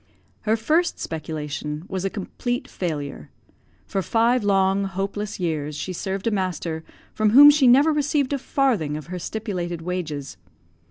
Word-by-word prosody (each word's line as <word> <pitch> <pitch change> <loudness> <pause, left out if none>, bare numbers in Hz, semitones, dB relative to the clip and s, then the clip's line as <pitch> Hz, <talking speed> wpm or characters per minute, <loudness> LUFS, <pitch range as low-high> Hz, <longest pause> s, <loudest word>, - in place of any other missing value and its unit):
Her 220 - +4
first 320 +10 +1
speculation 150 0 -5
was 190 -1 -3
a 195 - 0
complete 245 +6 -4
failure. 145 - -4 0.6
For 195 - -2
five 230 +4 +2
long, 195 0 +2
hopeless 195 +2 -4
years 155 -4 -2
she 185 +5 -4
served 190 +2 -4
a 230 - +2
master 180 -5 -2 0.3
from 215 -1 +2
whom 285 +6 +10
she 285 -3 +4
never 280 +6 +6
received 290 -2 +1
a 280 - -1
farthing 230 - 0
of 155 - -8
her 180 - -3
stipulated 175 -4 -4
wages. 160 - -4
195 Hz, 150 wpm, -23 LUFS, 160-235 Hz, 0.6 s, whom